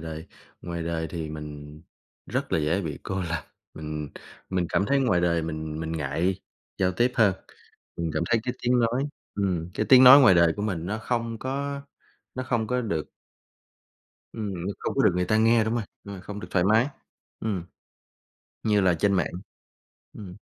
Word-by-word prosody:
đời. 80 0 -7 0.4
Ngoài 85 -1 -4
đời 80 -1 -2
thì 80 -3 -5
mình 75 0 -8 0.4
rất - - -3
là - - +3
dễ 80 +6 +1
bị 75 -3 -4
cô 95 -1 -3
lập, 85 -2 -3 0.3
mình 75 -1 -5 0.4
mình 90 -2 0
cảm - - +2
thấy 140 +4 +2
ngoài 100 -10 +2
đời 85 -1 +1
mình 80 -1 -4
mình 80 0 -3
ngại 85 +5 -1 0.4
giao 95 -1 +2
tiếp 120 +6 +1
hơn, 105 -5 +4 0.6
mình 85 -1 -2
cảm - - 0
thấy 115 -1 +3
cái 125 - -2
tiếng 125 0 +3
nói 120 +3 +1 0.3
ừm, 90 -4 -1
cái - - -1
tiếng 130 0 +9
nói 130 +3 +11
ngoài 125 -9 +7
đời 85 -1 +5
của 105 - -3
mình 90 -6 -2
nó 105 +4 -2
không 115 0 -2
có 140 +2 -3 0.5
nó 130 - -3
không 115 -4 0
có 125 +2 0
được 85 -9 -3 1.2
ừm, 105 -3 -4
nó 90 +3 -4
không - - -3
có - - +3
được - - +5
người 90 - +1
ta 110 +4 +2
nghe, 115 +1 +4
đúng 110 +1 -1
rồi, 115 - -1 0.2
ờ, 100 -2 -8
không 105 +2 -7
được 90 - -8
thoải 90 - +2
mái 110 +5 +4 0.5
ừm, 100 -6 -2 1.0
như 105 -2 +3
là 90 -2 +3
trên 100 +5 +1
mạng, 90 -5 +2 0.9
ừm. 95 -4 -9
95 Hz, 190 wpm, -26 LUFS, 80-115 Hz, 1.2 s, nói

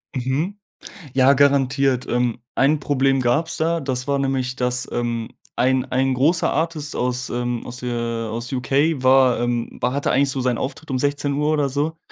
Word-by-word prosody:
Mhm. 135 +10 -2 0.6
Ja, 130 +1 +5
garantiert. 135 -2 +2
Ähm, 120 -1 0 0.2
ein 145 +3 +3
Problem 135 -1 +1
gab's 130 +7 0
da. 165 +1 0
Das 130 -2 -2
war 140 -1 +1
nämlich, 130 -2 -1
dass, 125 0 0
ähm, 120 -1 -2 0.3
ein 130 +1 +2
ein 130 0 +1
großer 155 +7 +2
Artist 160 -2 -2
aus, 125 0 -1
ähm 120 0 -3
aus 125 +1 -7
der, 125 -1 -4
äh 115 -1 -2
aus 115 +2 -4
UK 135 +3 +1
war, 130 -1 +4
ähm 120 -1 -2
hatte 130 +4 0
eigentlich 140 +1 +2
so 135 - -2
seinen 125 -1 0
Auftritt 145 +5 -5
um 130 - 0
16 145 +1 0
oder 145 -2 +1
so 150 +4 -2
130 Hz, 175 wpm, -21 LUFS, 125-140 Hz, 0.6 s, Ja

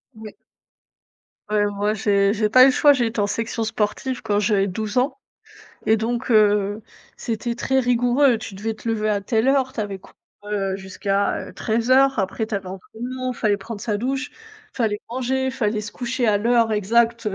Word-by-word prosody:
Ouais. 220 -1 -10 1.1
Ouais, 210 -1 +2
moi 205 +1 -1
j'ai 200 -1 +2
j'ai 215 -1 0
pas 255 +3 +7
eu - - +8
le - - +5
choix, 290 +2 +5
j'ai 245 -4 +1
été 225 0 -4
en 205 - +2
section 225 +2 -2
sportive 225 +4 -2
quand 205 0 0
j'avais 205 -1 +2
12 210 +4 -4
ans, 260 +9 +1 0.7
et 220 - +4
donc, 235 +3 -3
heu, 210 -1 +3 0.3
c'était 235 +1 -3
très 265 +3 0
rigoureux. 245 +1 +3
Tu 195 -2 -8
devais 220 +2 -3
te 225 - -8
lever 215 -1 0
à 205 -1 +1
telle 220 +4 0
heure, 270 -1 +2
tu - - -17
avais 200 -2 -4
cours, - - -18 0.3
heu, 200 -2 -2
jusqu'à, 195 +1 -2
heu, - - -11
13:00, 255 +4 +2
après 195 +3 -1
tu 215 - -1
avais 195 - -7
entrainement, 245 +7 -6
fallait 215 -4 0
prendre 210 +1 -8
sa 215 -2 -1
douche, 270 +5 -2 0.4
fallait 215 -4 -1
manger, 260 +2 -1
fallait 215 -4 -1
se 210 0 -8
coucher 245 0 -2
à 210 -2 +3
l'heure 230 +1 +2
exacte 230 +3 +1
heu 205 - -1
220 Hz, 190 wpm, -22 LUFS, 205-245 Hz, 1.1 s, eu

